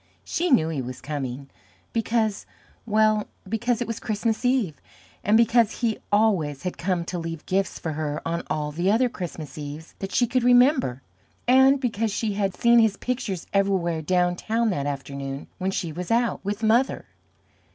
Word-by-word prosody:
She 350 +2 -1
knew 165 - +4
he 150 -5 -2
was 125 0 -6
coming, 135 -2 -5 0.4
because 225 -2 0 0.4
well, 215 -1 +3 0.2
because 225 +3 0
it 240 - -1
was 230 -1 -4
Christmas 220 +1 -1
Eve, 245 - +1 0.4
and 210 +3 +4
because 230 0 +3
he 225 -3 0
always 190 -10 +2
had 180 - -3
come 175 -1 -1
to 175 0 -4
leave 165 -1 -6
gifts 190 0 0
for 160 - -4
her 150 0 -2
on 170 +1 -1
all 150 -1 -1
the 175 +5 0
other 240 +4 +3
Christmas 160 - -7
Eves 150 +2 -8
that 195 0 -5
she 245 - +3
could 255 +2 0
remember, 245 - +4 0.4
and 265 +2 +6
because 225 -4 -1
she 210 +1 -1
had 195 -2 -1
seen 235 0 +5
his 220 -3 +3
pictures 230 -8 -3
everywhere 190 -5 +1
down 180 +2 +1
town 225 +4 0
that 145 -5 -2
afternoon 140 0 -5
when 190 +1 0
she 175 -3 -2
was 175 +3 -6
out 235 +1 +1
with 205 +3 -3
Mother. 235 +5 +2
195 Hz, 170 wpm, -25 LUFS, 160-230 Hz, 0.4 s, and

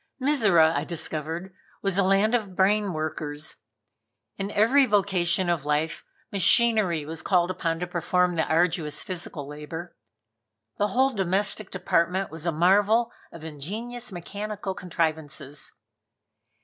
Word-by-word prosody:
Mizora, 210 - +4
I - - 0
discovered, 165 +2 -4 0.3
was 195 -2 +1
a - - +4
land 195 +4 +3
of 210 -6 -1
brain 200 +1 +2
workers. 155 -2 -4 0.8
In 195 0 -4
every 245 +7 +4
vocation 190 -3 +2
of 170 -5 0
life 150 +2 -1 0.3
machinery 200 -4 +3
was 160 +1 -5
called 180 -1 +2
upon 165 -2 -2
to - - 0
perform 180 +1 +1
the 160 - 0
arduous 165 -2 +1
physical 170 -6 -4
labor. 150 +4 -8 0.8
The 205 - +3
whole 260 +4 +2
domestic 195 +1 -1
department 180 0 0
was 160 +1 -5
a - - +2
marvel 205 +8 +3 0.2
of 165 - -11
ingenious 215 - -5
mechanical 200 +2 -5
contrivances. 160 -6 -3
180 Hz, 125 wpm, -26 LUFS, 160-205 Hz, 0.8 s, Mizora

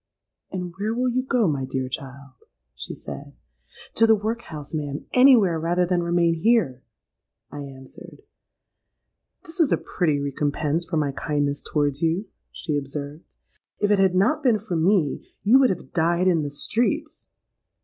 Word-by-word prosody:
'—'And 180 -2 -5
where 215 +3 -1
will 250 +1 +1
you 255 +2 +1
go, 250 -5 +1
my 140 -4 -1
dear 130 0 -3
child?' 135 0 -8 0.4
she 60 - -7
said.—'To 140 - -4
the 220 - +6
workhouse, 210 -9 -5
ma'am: 145 -2 -4
anywhere, 240 -10 +6
rather 175 +2 +1
than 175 0 0
remain 170 -1 +2
here!' 165 - +1 0.7
I 145 - -7
answered.—'This 140 - -15
is 320 -4 +3
a - - +4
pretty 155 -6 -1
recompense 145 +3 -1
for 165 - -2
my 145 -2 +1
kindness 145 0 -2
towards 145 -2 -1
you,' 165 +5 0 0.3
she 150 -3 -3
observed. 145 +3 -7 0.5
'If 205 0 +1
it 205 - +4
had 190 -2 +3
not 235 +12 +2
been 245 -6 +3
for 205 -3 -5
me, 165 -2 +2 0.2
you 230 +7 +6
would 260 -2 +5
have 180 - -5
died 175 +2 +2
in 170 -3 +3
the 145 - -3
streets.' 295 - -2
170 Hz, 150 wpm, -24 LUFS, 145-215 Hz, 0.7 s, the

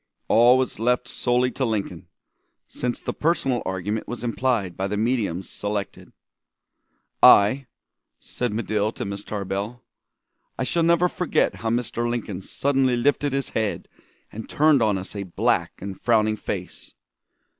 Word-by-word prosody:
All 120 +3 +6
was 130 -4 -1
left 125 +2 +1
solely 125 +1 +1
to 135 - -3
Lincoln, 100 -7 -3 0.6
since 125 -1 -3
the - - -4
personal 135 -7 0
argument 95 +4 -3
was 120 0 -6
implied 115 -6 0
by 95 - -2
the 105 +1 -2
mediums 105 -6 -1
selected. 100 -1 -5 1.1
"I" 120 +7 +6 0.5
said 125 -2 -3
Medill 110 -1 -1
to - - -5
Miss 100 0 -5
Tarbell 105 +4 -4 0.7
"I - - -1
shall 170 +6 0
never 170 +1 +4
forget 180 0 0
how 115 - -3
Mr. 120 0 -1
Lincoln 110 -6 -3
suddenly 135 +3 +1
lifted 145 +3 +1
his 135 -1 -2
head 110 -2 -2 0.4
and 110 +1 -8
turned 150 -3 +4
on 105 -3 +2
us 95 +2 -8
a 100 - -3
black 95 -3 0
and 95 0 -7
frowning 110 -2 +3
face. - - -7
115 Hz, 145 wpm, -24 LUFS, 100-125 Hz, 1.1 s, All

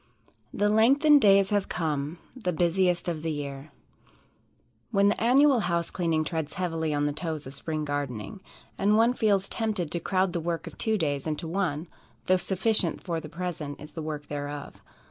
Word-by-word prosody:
The 205 - +1
lengthened 275 +8 +5
days 195 -1 +5
have 205 -1 +1
come, 150 -1 -2 0.2
The 220 -8 -2
busiest 175 +1 +1
of 165 -3 -2
the 165 - -2
year 140 -1 -5 1.2
When 200 0 +4
the 205 - -1
annual 265 +2 +5
house 170 -4 -1
cleaning 165 -3 0
treads 160 -1 -3
heavily 165 -3 -1
on 145 0 0
the 145 - 0
toes 160 -1 -4
of 130 - -8
spring 155 +1 -3
gardening, 145 - -4 0.4
and 210 +2 +3
one 230 +2 +4
feels 200 -5 +2
tempted 210 -8 -1
to 170 - -1
crowd 185 +1 0
the 170 - -1
work 170 0 -3
of - - -9
two 220 -1 +1
days 145 -5 -1
into 155 +2 -3
one, 165 -3 -1 0.4
though 185 - +4
sufficient 190 -2 0
for 170 -3 -2
the 155 - -9
present 160 -3 -5
is 150 - -10
the 165 - -6
work 150 -1 -5
thereof. 145 0 -6
170 Hz, 180 wpm, -27 LUFS, 150-200 Hz, 1.2 s, lengthened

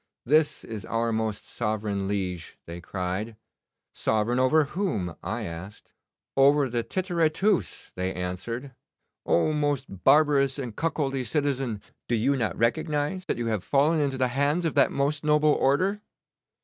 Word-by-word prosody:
"This 150 +3 +2
is 110 -3 -7
our 115 0 -1
most 110 -2 -2
sovereign 105 -3 -2
liege," 95 -4 -3
they 85 +1 -8
cried. 95 +5 -4 0.6
"Sovereign 110 +3 +1
over 150 +5 +4
whom?" 140 - -2
I - - -3
asked. 85 +5 -9 0.4
"Over 140 0 +4
the 120 0 0
Tityre 175 +3 0
Tus," 200 +3 0
they 95 +1 -2
answered. 115 +10 -5 0.5
"Oh, 155 - +3
most 145 -3 0 0.2
barbarous 140 -1 +4
and 125 -6 -5
cuckoldy 140 -5 -1
citizen, 135 -4 -1 0.2
do 120 - +1
you 130 +6 +2
not 115 -5 -1
recognise 150 +8 0
that - - -2
you 120 - -2
have 110 -4 -1
fallen 150 +3 +2
into 135 -2 0
the 130 -1 +1
hands 145 +7 +1
of 160 - 0
that - - +4
most 145 +2 0
noble 150 0 +4
order?" 185 +10 +1
135 Hz, 150 wpm, -26 LUFS, 110-150 Hz, 0.6 s, over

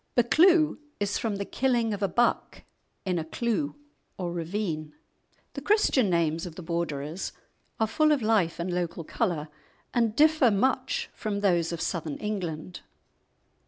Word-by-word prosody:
"Buccleuch" 310 +7 +4 0.2
is 205 0 0
from 220 -3 -1
the 200 0 -3
killing 240 -3 +1
of 205 - -5
a 200 - +2
buck 240 +4 0 0.4
in 180 -2 0
a - - -2
cleugh 235 - -2 0.4
or 175 -2 -3
ravine. 165 -3 -3 0.6
The 280 - -6
Christian 290 - +3
names 165 -1 +1
of 165 - -10
the 180 - -8
Borderers 160 0 -3 0.5
are 220 - +3
full 305 +8 +2
of 285 -6 +2
life 210 -7 +2
and 175 +1 -2
local 170 -1 -2
colour, 165 -4 -1 0.5
and 230 -3 +1
differ 310 -3 +5
much 255 +5 0
from 205 -2 -3
those 175 -4 +2
of 170 -1 -4
Southern 160 -5 -2
England. 180 -5 -4
200 Hz, 150 wpm, -27 LUFS, 170-240 Hz, 0.6 s, differ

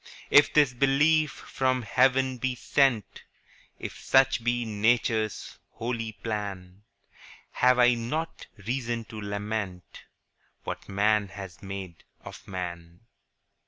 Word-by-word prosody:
20 - - -3
If 145 - +1
this 145 -4 +5
belief 145 +4 +3
from 130 -1 -1
heaven 130 +3 +2
be 130 +1 -1
sent, 125 -3 +1 0.6
If - - -7
such 135 -3 +3
be 120 0 0
Nature's 110 0 0
holy 115 -1 -4
plan, 100 -4 -5 0.7
Have 125 0 +3
I 125 0 +6
not 140 +8 -4 0.2
reason 120 -1 -2
to 110 -1 -7
lament 100 -2 -5 0.6
What - - -6
man 105 +1 +2
has 95 -3 -10
made 95 -3 -8 0.2
of - - -11
man? 85 -2 -6
115 Hz, 115 wpm, -27 LUFS, 100-130 Hz, 0.7 s, I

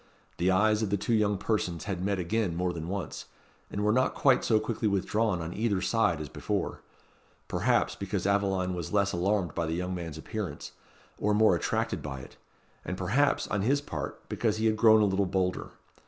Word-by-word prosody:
The 90 +2 +1
eyes 105 +3 +3
of 110 - 0
the 100 - +1
two 105 +4 -1
young 105 -2 +2
persons 90 -5 -1
had 95 -4 -3
met 100 0 0
again 95 0 -1
more 90 +1 -1
than 80 -1 -5
once, 95 -4 -4 0.4
and 100 - -3
were 105 - +3
not 130 +3 +2
quite 135 -3 +4
so 110 -2 +3
quickly 110 0 -2
withdrawn 100 -1 0
on 80 +2 -5
either 105 -3 0
side 95 -5 +1
as 75 - -5
before; - - -3 0.7
perhaps, - - +1
because - - -3
Aveline 95 -2 +1
was 85 -3 -5
less 100 -1 +2
alarmed 90 -2 0
by 85 -1 -1
the 80 - -1
young 90 +1 -2
man's 85 -4 -5
appearance, 105 +4 -5 0.5
or 105 0 +2
more 110 -3 +5
attracted 85 - -1
by 70 -3 -6
it; - - -13 0.5
and 95 - -4
perhaps, 115 +11 +1
on 100 - 0
his 135 +8 +2
part, 145 - -5
because 110 -2 0
he 110 - -1
had 110 -1 +3
grown 110 -1 +6
a - - +5
little 100 0 +1
bolder. 90 0 -1
100 Hz, 200 wpm, -29 LUFS, 90-110 Hz, 0.7 s, grown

